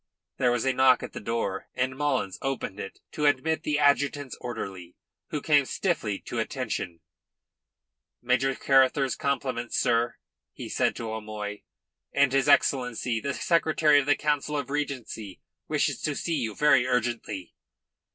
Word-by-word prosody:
There 125 -2 +3
was 120 +1 0
a 135 - +2
knock 130 -1 +5
at - - -7
the - - -5
door, 105 -3 -2
and 130 +1 -1
Mullins 135 -9 -1
opened 135 -7 -3
it 95 - -7
to 150 -1 +1
admit 150 +3 +1
the 150 -1 0
adjutant's 145 -1 +2
orderly, 95 -7 -6 0.3
who 150 - -3
came 145 -3 +5
stiffly 130 - -1
to - - -5
attention. 85 -1 -3 1.2
"Major 130 +2 +1
Carruthers's 135 0 +3
compliments, 130 -4 -2
sir," 115 0 +2 0.4
he - - -8
said - - +1
to 115 -1 -5
O'Moy, 105 -1 -6 0.5
"and 140 -2 +3
his 135 +2 +2
Excellency 125 -4 +2
the 140 +4 -3
Secretary 155 -3 +3
of 140 - -2
the 145 - +5
Council 150 0 -1
of 140 -1 -4
Regency 130 -9 -4 0.3
wishes - - 0
to 150 - -1
see 170 - -2
you 115 -6 -3
very 130 -4 +4
urgently." 120 -6 -2
130 Hz, 150 wpm, -27 LUFS, 115-145 Hz, 1.2 s, knock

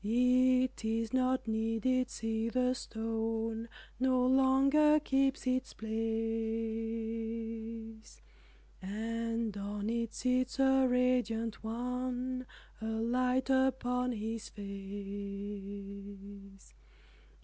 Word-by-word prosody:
It 255 +3 +3
is 225 +1 -1
not 255 -1 +2
needed, 225 +3 +1
see 225 -1 -1
the 255 +1 +2
stone 225 -1 -2 0.3
No 255 -1 +3
longer 270 +4 +5
keeps 270 -1 +1
its 255 0 0
place, 220 0 -7 2.9
And 225 +2 -2
on 205 +1 -3
it 230 -1 -2
sits 255 0 +1
a 265 -1 +5
radiant 245 -3 +1
one 250 +2 -2 0.3
A - - -4
light 250 +4 +1
upon 250 -1 +2
his 225 0 -4
face. 200 - -7
230 Hz, 85 wpm, -33 LUFS, 220-255 Hz, 2.9 s, longer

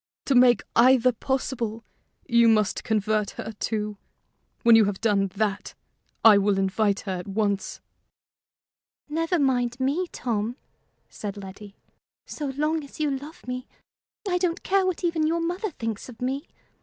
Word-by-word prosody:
To 275 - +2
make 245 -1 +5
either 255 +1 +5
possible, 235 -2 -3 0.4
you 235 -2 +4
must 215 -2 +2
convert 215 -1 0
her, 220 - -5
too. 210 -2 -2 0.7
When 235 -1 +7
you 225 -1 +6
have 200 -1 -2
done 205 -3 +2
that, 205 -1 -2 0.5
I 210 -3 +9
will 200 0 +2
invite 195 +1 +1
her 195 - -5
at 180 - -8
once." 200 0 -2 1.3
"Never 330 +4 0
mind 250 -4 +1
me, 285 +8 0
Tom," 230 -5 -3 0.5
said 205 -1 -7
Letty. 200 +1 -10 0.5
"So 295 - -5
long 300 +3 -1
as 280 - -13
you 300 -2 +1
love 290 +4 -10
me, 250 +1 -5 0.6
I 360 -1 +1
don't 350 -1 -1
care 385 -1 +2
what 370 -1 -2
even 330 -3 +1
your 335 +1 +1
mother 355 +6 -2
thinks 225 - -5
of 230 -3 -12
me. 265 +3 -3
240 Hz, 150 wpm, -25 LUFS, 210-290 Hz, 1.3 s, I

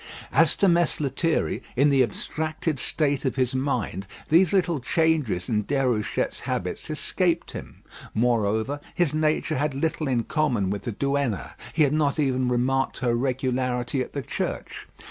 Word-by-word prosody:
As - - +5
to 200 - +3
Mess 170 -2 +3
Lethierry, 155 +3 0
in 140 +4 +4
the 135 -2 +4
abstracted 155 - -2
state 145 -1 0
of 130 -3 -1
his 130 -2 +1
mind, 125 - -2 0.2
these 170 +2 +5
little 180 -5 +2
changes 145 - +1
in 105 -2 +1
Déruchette's 125 -6 0
habits - - -3
escaped - - 0
him. - - -9 0.3
Moreover, 110 +3 +1 0.2
his 175 -5 +1
nature 155 -1 +1
had 145 -1 0
little 155 +1 -1
in 125 -3 +1
common 120 -10 0
with 100 +4 -4
the 120 - -2
Duenna. 140 - -1 0.2
He 155 - +3
had 145 -1 +2
not 150 -2 +1
even 130 -4 +1
remarked 130 +2 +1
her 120 -2 0
regularity 125 0 -1
at 125 - -5
the 140 - -3
church. - - -4
135 Hz, 155 wpm, -25 LUFS, 120-155 Hz, 0.3 s, As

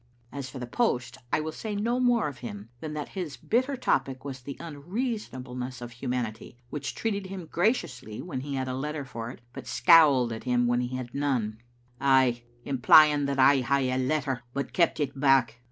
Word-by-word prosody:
As 135 -1 -5
for 130 - -9
the 125 - -4
post, 125 - -1
I - - +2
will 155 +1 -3
say 210 +5 -5
no 235 +5 0
more 245 -5 +3
of 140 -3 -7
him 105 -2 -8
than 155 +2 -6
that 150 -1 -4
his 175 -7 -5
bitter 260 +4 0
topic 135 - 0
was 135 -2 -6
the 140 +2 -7
unreasonableness 145 - -4
of 120 -1 -7
humanity, 120 -1 -4
which 145 -2 -4
treated 200 -4 -2
him 190 -2 -7
graciously 155 - -1
when 150 -7 -4
he 140 +1 -4
had 130 -1 -2
a 130 - -2
letter 145 +2 -3
for 115 -3 -6
it, 120 - -10
but - - -9
scowled 140 -8 +5
at 110 - -8
him 125 -1 +2
when 120 0 +2
he 125 +1 -3
had 125 -2 -6
none, 125 -7 -1 0.2
" 120 0 -35
aye 130 -3 +4 0.2
imply 140 +3 +7
ing 145 -1 0
that 140 0 -1
I 135 +1 +6
hae 130 +1 +1
a 130 - 0
letter, 135 -1 0
but 140 -2 -3
keep 170 -2 +2
it 140 -2 -2
back." 135 -4 +3
135 Hz, 200 wpm, -28 LUFS, 125-155 Hz, 0.2 s, imply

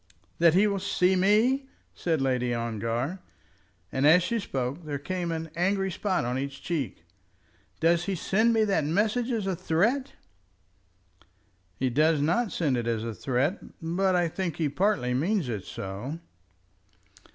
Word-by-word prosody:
"That 170 -1 +5
he 195 +3 +5
will 200 -2 0
see 185 0 +2
me?" 225 +9 +3 0.2
said 160 -5 -1
Lady 125 -2 0
Ongar, 115 - -2 0.7
and 135 +2 +2
as 170 +3 +6
she 230 +5 -1
spoke 135 - -3
there 145 -2 -3
came 175 +3 -3
an 160 -1 -4
angry 195 +2 +1
spot 185 - -1
on 125 +2 -1
each 135 0 -5
cheek. 155 -8 -3 0.8
"Does 170 +1 +3
he 195 - -1
send 215 +7 +2
me 225 -1 +3
that 200 -6 +1
message 215 - +1
as 220 -4 -1
a 190 -1 0
threat?" 205 +11 0 1.6
"He 130 +2 0
does 155 +4 +3
not 175 +10 +1
send 145 -7 0
it 120 -1 -2
as 115 -2 -1
a 115 -1 -4
threat, 135 - 0 0.2
but 180 +3 +1
I 175 -1 +2
think 170 -1 -3
he 155 -3 0
partly 180 -6 +1
means 170 +5 0
it 105 -5 -4
so." 100 +11 -6
165 Hz, 155 wpm, -27 LUFS, 135-195 Hz, 1.6 s, as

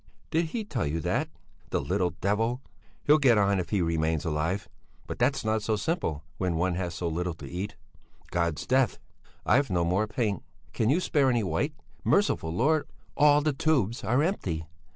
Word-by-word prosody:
"Did 165 +1 +2
he 220 +8 -3
tell 135 - -2
you 80 +3 -1
that? - - 0 0.4
The - - 0
little 90 -1 0
devil! 115 +6 0 0.4
He'll 150 +1 +5
get 125 -6 +5
on 100 -1 +3
if 85 - -3
he 100 -4 +1
remains 80 -1 0
alive; 80 +5 -1 0.4
but - - -6
that's 130 0 +1
not 110 0 +1
so 110 +1 0
simple 105 - -2 0.2
when 90 -3 0
one 90 +2 +1
has 85 -1 -3
so 85 - -2
little 85 +1 -2
to 75 -4 -9
eat! 95 +8 -5 0.6
God's 85 -4 -1
death! 130 -2 +2 0.5
I've 140 0 +3
no 85 -2 +1
more 95 +5 +1
paint! 105 -4 -1 0.3
Can 110 - +1
you 160 +7 +3
spare 145 -7 +2
any 120 -3 +2
white? 145 - -1 0.3
Merciful 200 - +2
Lord! 145 - +2 0.3
All 145 0 +5
the 150 0 +1
tubes 130 -6 +1
are 125 +6 +2
empty! 90 - -2
105 Hz, 180 wpm, -28 LUFS, 85-135 Hz, 0.6 s, He'll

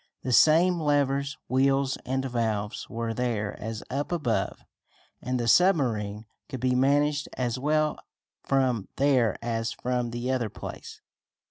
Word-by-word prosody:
The 130 - -1
same 170 +6 +5
levers, 140 -2 +1
wheels 135 +1 +2
and 130 +1 -1
valves 110 -4 -2
were 115 0 -3
there 110 -4 -2
as 110 0 -5
up 140 +6 -2
above, 145 -10 -1 0.6
and 125 0 -2
the 120 - -1
submarine 115 - +2 0.2
could 130 -3 -5
be 125 +1 +1
managed 145 +3 +2
as 125 -1 -1
well 155 +2 +1 0.4
from 130 -6 +1
there 130 -7 +2
as 115 -1 -2
from 125 -1 -2
the 120 +2 -3
other 125 -4 -1
place. - - -9
130 Hz, 135 wpm, -27 LUFS, 115-140 Hz, 0.6 s, same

